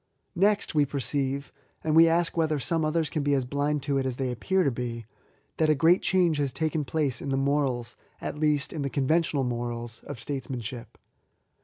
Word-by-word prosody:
Next, 200 Hz, +2 st, +2 dB
we 150 Hz, -2 st, +4 dB
perceive, 140 Hz, 0 st, -2 dB, 0.3 s
(and 155 Hz, -1 st, +1 dB
we 165 Hz, +1 st, +8 dB
ask 165 Hz, +1 st, +1 dB
whether 160 Hz, -2 st, +1 dB
some 160 Hz, +4 st, -1 dB
others 155 Hz, +1 st, +1 dB
can 155 Hz, -, -2 dB
be 145 Hz, 0 st, +2 dB
as 130 Hz, -2 st, 0 dB
blind 145 Hz, +2 st, -1 dB
to 140 Hz, -1 st, 0 dB
it 135 Hz, -, -1 dB
as 130 Hz, -, -2 dB
they 130 Hz, -1 st, -2 dB
appear 190 Hz, -, +1 dB
to 140 Hz, -, +2 dB
be,) 115 Hz, -2 st, -4 dB, 0.5 s
that 155 Hz, -1 st, +2 dB
a 155 Hz, -, +5 dB
great 165 Hz, +6 st, +4 dB
change 175 Hz, -3 st, +2 dB
has 140 Hz, -2 st, 0 dB
taken 155 Hz, 0 st, -1 dB
place 140 Hz, -3 st, -1 dB
in -, -, -4 dB
the 135 Hz, -, +1 dB
morals 135 Hz, -3 st, 0 dB
— -, -, -36 dB
at -, -, -4 dB
least, 150 Hz, -2 st, +1 dB
in 155 Hz, -, -3 dB
the 140 Hz, -, -1 dB
conventional 145 Hz, +1 st, +1 dB
morals, 120 Hz, -1 st, -4 dB
of -, -, -6 dB
States 135 Hz, +2 st, -5 dB
manship. 120 Hz, -2 st, -6 dB
145 Hz, 205 wpm, -27 LUFS, 130-160 Hz, 0.5 s, we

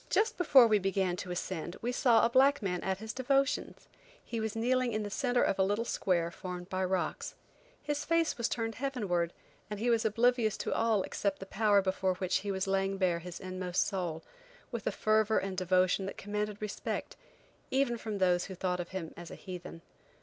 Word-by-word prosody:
Just 440 Hz, +2 st, +2 dB
before 275 Hz, -8 st, +7 dB
we 215 Hz, -2 st, +4 dB
began 190 Hz, -2 st, 0 dB
to 180 Hz, -, -6 dB
ascend 175 Hz, -1 st, -4 dB
we 240 Hz, -, 0 dB
saw 245 Hz, -2 st, +4 dB
a -, -, +2 dB
black 270 Hz, 0 st, +4 dB
man 180 Hz, -2 st, -1 dB
at 190 Hz, -1 st, -1 dB
his 220 Hz, +2 st, -6 dB
devotions. 270 Hz, +1 st, 0 dB, 0.4 s
He 230 Hz, -, -3 dB
was 220 Hz, -1 st, -2 dB
kneeling 250 Hz, +1 st, +1 dB
in 215 Hz, 0 st, -1 dB
the 205 Hz, -, -5 dB
centre 245 Hz, +1 st, +1 dB
of 195 Hz, -, +1 dB
a -, -, +5 dB
little 205 Hz, +4 st, 0 dB
square 170 Hz, -6 st, 0 dB
formed 180 Hz, +1 st, -7 dB
by 185 Hz, 0 st, -1 dB
rocks. 185 Hz, -1 st, -2 dB, 0.5 s
His 290 Hz, 0 st, -2 dB
face 330 Hz, +1 st, +1 dB
was 235 Hz, -1 st, -1 dB
turned 225 Hz, -1 st, -2 dB
heavenward, 205 Hz, -10 st, -1 dB, 0.4 s
and 210 Hz, -1 st, -5 dB
he 240 Hz, +2 st, +2 dB
was 230 Hz, 0 st, +2 dB
oblivious 230 Hz, 0 st, +2 dB
to -, -, -2 dB
all 225 Hz, -1 st, +2 dB
else -, -, -4 dB
except 200 Hz, -1 st, -1 dB
the 195 Hz, -, -8 dB
power 205 Hz, 0 st, +3 dB
before 190 Hz, -1 st, 0 dB
which 185 Hz, 0 st, 0 dB
he 200 Hz, 0 st, -3 dB
was 190 Hz, -1 st, -1 dB
laying 195 Hz, 0 st, 0 dB
bare 180 Hz, -3 st, +1 dB
his 175 Hz, 0 st, -8 dB
inmost 185 Hz, -1 st, -1 dB
soul, 175 Hz, -5 st, -3 dB, 0.5 s
with 235 Hz, -2 st, -4 dB
a -, -, +2 dB
fervor 215 Hz, 0 st, +2 dB
and 195 Hz, -1 st, -1 dB
devotion 185 Hz, +1 st, +2 dB
that -, -, -6 dB
commanded 210 Hz, +1 st, -3 dB
respect, 210 Hz, -, -4 dB, 0.5 s
even 265 Hz, -2 st, +1 dB
from 220 Hz, -2 st, -4 dB
those 180 Hz, -2 st, +2 dB
who 190 Hz, -, -7 dB
thought 180 Hz, 0 st, -1 dB
of 175 Hz, -, -4 dB
him 185 Hz, -4 st, -5 dB
as 175 Hz, -1 st, -9 dB
a -, -, -8 dB
heathen. 175 Hz, -2 st, -9 dB
200 Hz, 205 wpm, -31 LUFS, 185-230 Hz, 0.5 s, before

